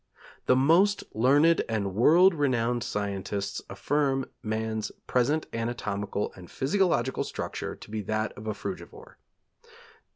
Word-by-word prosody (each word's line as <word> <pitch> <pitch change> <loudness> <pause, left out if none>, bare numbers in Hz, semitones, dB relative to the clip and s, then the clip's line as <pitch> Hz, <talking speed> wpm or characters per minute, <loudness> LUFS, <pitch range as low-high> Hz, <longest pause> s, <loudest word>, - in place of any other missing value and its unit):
The 125 - +5
most 170 +10 +4
learned 145 +8 +4
and 100 -4 -1
world 170 - +6
renowned 125 -5 0
scientists 100 0 -3
affirm 135 +5 0 0.2
man's 110 0 -2
present 140 +6 +1
anatomical 105 -3 -3
and 90 -2 -12
physiological 180 +7 +1
structure - - -5
to - - -13
be 110 -1 -2
that 110 +1 -1
of 110 - -9
a 110 - -2
frugivore. 430 - -8
120 Hz, 120 wpm, -28 LUFS, 105-150 Hz, 0.2 s, world